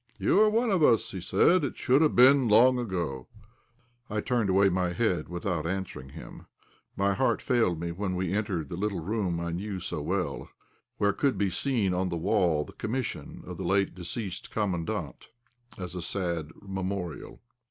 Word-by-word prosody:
"You - - +3
are 215 0 +6
one 230 +1 +1
of 185 -4 +2
us," 115 -6 +5 0.2
said 180 - +4
he; 145 - 0
"it - - -9
should 130 +4 +3
have 155 - +3
been 130 +1 +6
long 125 +4 +5
ago." 85 - -3 0.8
I 105 - -1
turned 115 -2 0
away 95 +1 +4
my 90 -1 0
head 90 -6 0
without 85 -2 -2
answering 95 -7 -4
him. - - -11 0.5
My 100 0 +2
heart 130 +7 +1
failed 115 - +1
me 85 0 -3
when 95 +1 -3
we 90 0 -1
entered 100 -8 -2
the - - -4
little 100 -2 -2
room 95 -2 -1
I 85 0 -3
knew 95 +3 -4
so 80 -3 -4
well, 85 -2 -2 0.5
where 100 -1 +2
could 140 -2 +1
still 100 +1 +1
be - - 0
seen 110 -2 0
on 90 +1 0
the 85 - -2
wall 80 -2 +1
the - - -13
commission 125 +2 -4
of 90 -1 -7
the 95 - -5
late 95 +2 +1
deceased 95 +2 -5
Commandant, 95 -6 -3 0.5
as 90 -2 -6
a 90 - -4
sad 85 -3 -2
memorial. 95 -4 -5
95 Hz, 185 wpm, -28 LUFS, 85-110 Hz, 0.8 s, are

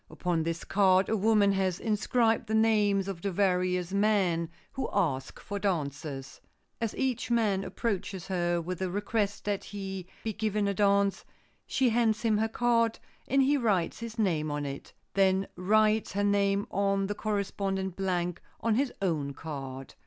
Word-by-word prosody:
Upon 175 -2 -1
this 165 +1 -3
card 190 -1 +3
a 220 - +2
woman 210 -1 +4
has 190 -2 0
inscribed 225 +1 +1
the 220 - 0
names 210 -3 +3
of 190 -4 -5
the 200 - -1
various 180 -1 +1
men 195 -5 +2 0.2
who 270 - -3
ask 140 -10 -1
for 200 0 -5
dances. 140 -7 -3 0.4
As 230 -2 -1
each 255 -3 -1
man 215 -5 +2
approaches 195 -2 -3
her 175 -2 0
with 175 +1 -4
the 190 -1 -1
request 205 +1 -1
that 205 -1 -1
he 195 -2 -6 0.2
be 220 - -2
given 210 -1 0
a 200 - +1
dance, 200 -1 +2 0.4
she 260 -2 +2
hands 225 -1 +2
him 215 -2 +2
her 220 +1 +1
card 230 -1 +2 0.3
and 275 +1 +3
he 285 +2 +3
writes 200 -9 0
his 230 0 -7
name 165 -8 +1
on 145 0 -2
it, 140 0 -6 0.2
then 195 0 +3
writes 215 +3 +2
her 205 +1 0
name 200 0 +2
on 195 0 +1
the 205 - -2
corresponding 195 -2 -2
blank 180 -2 -2 0.2
on 230 - +1
his 260 +3 +1
own 150 -6 -1
card. 135 -4 -7
200 Hz, 165 wpm, -29 LUFS, 180-215 Hz, 0.4 s, woman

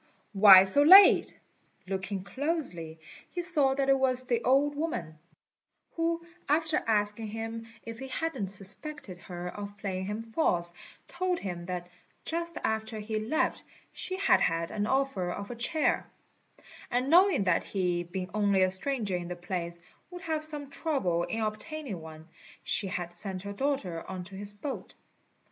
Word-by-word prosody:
why 195 -2 +10
so 195 +9 +4
late?" 380 +7 +8 0.5
Looking 190 0 -3
closely, 200 - -3 0.3
he 350 - -4
saw 295 -7 +2
that 275 0 0
it 270 0 +4
was 255 -1 +2
the 240 -2 0
old 275 +3 +3
woman, 175 - -4 0.7
who, 335 0 -1 0.2
after 320 +1 +2
asking 210 0 0
him 225 +1 -5 0.2
if 230 0 -8
he 265 - -6
hadn't 270 -6 -3
suspected 200 - -5
her 175 0 -7
of 205 +1 -8
playing 190 -2 -3
him 210 +3 -4
false, 180 - 0 0.3
told 365 0 -1
him 175 -3 -5
that 180 -1 -4 0.4
just 335 +1 -2
after 220 0 -2
he 215 +1 -3
left 230 +9 0 0.3
she 375 - -2
had 395 - +4
had 165 0 +1
the 210 -1 -2
offer 265 -10 0
of 200 +5 -5
a - - -5
chair; 295 +7 0 0.8
and 250 +3 0
knowing 365 - +6
that 180 -3 +2
he, 180 -3 -1
being 180 +1 -5
only 200 -2 +3
a 185 - +2
stranger 210 -1 -1
in 175 -1 -4
the 180 - -5
place, 175 -1 -4 0.3
would 355 0 -9
have 315 -2 -1
some 295 -2 0
trouble 190 - 0
in 225 - -3
obtaining 215 - -4
one, 160 0 -11 0.4
she 200 - 0
had 175 -2 -4
sent 185 +1 -4
her 200 0 -5
daughter 200 - -2
on 185 -1 -5
to 185 +2 -13
his 200 +1 -5
boat. 205 +7 -6
215 Hz, 160 wpm, -29 LUFS, 185-285 Hz, 0.8 s, why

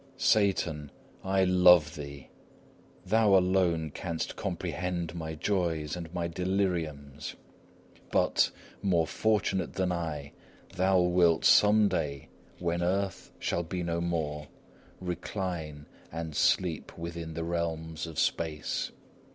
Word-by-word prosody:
Satan, 95 - +2 0.3
I 95 0 +2
love 90 -3 +6
thee! 70 -2 -8 0.8
Thou 105 0 +4
alone 90 -4 +2
canst 85 +1 -4
comprehend 90 -2 -3
my 80 -2 -5
joys 80 -4 -1
and 85 -2 -7
my 85 -1 -2
deliriums. 85 -6 -2 0.8
But, - - +3 0.3
more 85 -4 +2
fortunate 100 -2 0
than 95 -1 0
I, 80 -5 -3 0.4
thou 95 0 +3
wilt 90 -2 +3
some 105 0 +6
day, 70 -7 -2 0.3
when 85 0 -1
earth 95 +2 -1
shall 85 - -1
be 90 +1 -4
no 85 0 -1
more, 75 -4 -2 0.5
recline 90 -4 -4 0.3
and 80 -2 -5
sleep 85 0 +1
within 85 -1 -6
the 85 - -2
realms 80 -1 -3
of 80 -3 -9
space. 80 -2 -1
85 Hz, 110 wpm, -29 LUFS, 80-90 Hz, 0.8 s, love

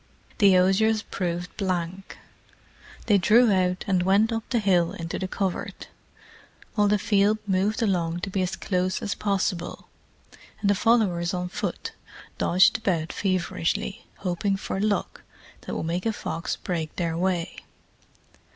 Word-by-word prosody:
The 195 -2 +6
osiers 205 +4 +3
proved 175 -1 -4
blank: 185 -1 -3 0.9
they 205 -3 +4
drew 220 +6 +5
out, 180 -1 +1
and 185 -2 +2
went 200 +5 +3
up 225 - -1
the 250 - +1
hill 185 -6 +2
into 165 -1 -5
the 190 - -2
covert, 190 -1 -4 0.8
while 210 -2 +3
the 210 +1 +3
field 205 +1 +2
moved 205 +4 +1
along 175 -4 0
to 195 - -4
be 190 - 0
as 185 +1 -1
close 185 -1 -1
as 205 - -1
possible, 190 -4 -2 0.7
and 200 - +2
the - - +5
followers 190 -5 +2
on 180 0 -3
foot - - -4 0.5
dodged 185 +5 +4
about 170 -7 -1
feverishly, 185 +2 -1
hoping 195 +2 -1
for 195 - -4
luck 205 -1 -1 0.5
that - - -3
would - - -3
make 175 +5 -1
a 225 - +1
fox 165 - -3
break 165 -4 -4
their 170 -2 -1
way. 175 -1 -1
190 Hz, 145 wpm, -25 LUFS, 175-205 Hz, 0.9 s, The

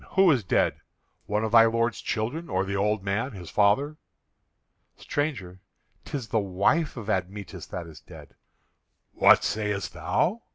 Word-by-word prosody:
Who 190 -2 +5
is 130 -7 +1
dead? 90 - +1 0.5
One 105 +1 0
of 110 - -2
thy 115 -1 +8
lord's 115 +1 0
children, 125 +10 -3
or 95 +1 0
the 100 0 -3
old 105 0 0
man, 105 +7 -2
his 90 -4 -9
father?" 120 +9 +2 1.0
"Stranger, 120 - -3 0.5
'tis 130 -7 -5
the 110 - +1
wife 100 - 0
of 110 -3 -7
Admetus 100 0 -4
that 90 - -6
is 80 -2 -12
dead." - - -14 0.8
"What - - +5
sayest 105 -2 -2
thou? 220 +6 0
105 Hz, 150 wpm, -26 LUFS, 100-130 Hz, 1.0 s, thy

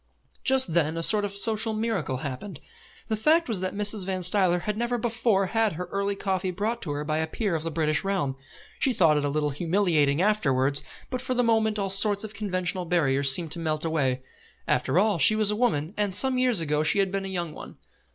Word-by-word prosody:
Just 260 -10 +4
then 160 -1 +1
a 165 - -2
sort 210 +4 +3
of 200 - -4
social 220 +2 0
miracle 215 - -2
happened. 140 +5 -7 0.5
The 220 - -1
fact 315 +10 +2
was 220 -6 -1
that 185 +1 -4
Mrs. 205 0 +1
Van 185 -1 -3
Stuyler 180 -1 +3
had 210 +3 -3
never 240 +2 -2
before 225 -4 0
had 225 +2 0
her 180 +3 -5
early 200 0 -2
coffee 190 -1 -2
brought 210 +6 -3
to 150 - -3
her 145 +1 -4
by 155 0 -1
a 160 - -1
peer 200 +3 -3
of 160 - -2
the 165 - -3
British 155 -1 0
Realm. 185 -9 -2 0.4
She 265 - +2
thought 165 -8 +3
it 150 - 0
a - - 0
little 150 0 -1
humiliating 160 -2 +1
afterwards, 140 -9 +1 0.3
but 255 -1 -3
for 255 0 -3
the 245 - +2
moment 220 -2 +1
all 195 -2 -2
sorts 200 +1 +5
of 215 -1 -7
conventional 185 -3 -2
barriers 140 -6 +2
seemed 160 +2 +3
to 170 - -1
melt 155 -1 -2
away. 135 -5 -1 0.4
After - - 0
all 200 -2 +2
she 215 +9 +7
was 215 -1 +1
a - - -1
woman, 175 -8 -1
and 205 -3 -1
some 260 +2 +1
years 250 -7 +1
ago 150 -1 0
she 155 - +2
had 195 -1 +1
been 195 0 -3
a - - -4
young 175 -4 -4
one. - - -11
190 Hz, 225 wpm, -25 LUFS, 160-215 Hz, 0.5 s, she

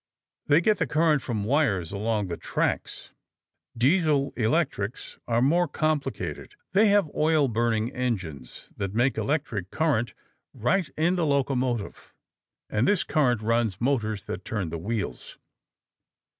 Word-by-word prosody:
They 150 +3 +5
get 210 +3 +2
the - - +1
current 155 -2 +2
from 110 -5 -3
wires 105 - +1
along 105 +1 -1
the 85 -2 -4
tracks. - - -3 0.7
Diesel 145 +1 +2
electrics 120 -3 -1
are 115 +1 +2
more 170 +6 +3
complicated. 155 -1 -2 0.2
They 205 +3 +5
have 200 -7 +3
oil 155 -2 +3
burning 115 -1 0
engines 90 - -4
that 100 0 -3
make 125 +3 +2
electric 120 - -2
current 140 -6 0 0.4
right 165 - +1
in 170 +4 +2
the 170 - +1
locomotive, 130 -5 -1 0.5
and 110 +4 0
this 205 -4 +3
current 125 -7 +1
runs 115 -4 +1
motors 110 -6 0
that 95 - -5
turn 100 -6 -3
the 85 - -4
wheels. 100 - -4
125 Hz, 130 wpm, -26 LUFS, 105-155 Hz, 0.7 s, They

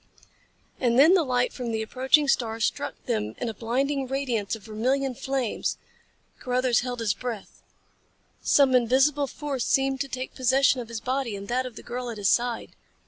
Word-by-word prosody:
And 240 -2 +2
then 310 +7 +7
the 375 - +5
light 250 -2 0
from 245 -3 -4
the 220 0 -1
approaching 265 +6 +2
star 225 -4 0
struck 225 - -2
them 105 0 -2
in 240 - -3
a - - -4
blinding 265 +5 -1
radiance 245 -6 -1
of 220 - -13
vermilion 255 +6 -1
flames. 260 -2 -2 0.6
Carruthers 250 -1 +1
held 245 -1 -4
his 215 -3 +1
breath. 230 -2 -7 0.8
Some 275 -2 +4
invisible 265 +4 +3
force 275 -2 -4
seemed 270 0 +1
to 280 - -2
take 260 0 -5
possession 260 0 +3
of 235 - -8
his 230 -1 -6
body 255 -3 -2
and 200 0 -7
that 255 +1 0
of 245 - -11
the - - -10
girl 245 0 -5
at 230 - -6
his 200 -2 +1
side. 240 -1 0
250 Hz, 180 wpm, -26 LUFS, 230-270 Hz, 0.8 s, then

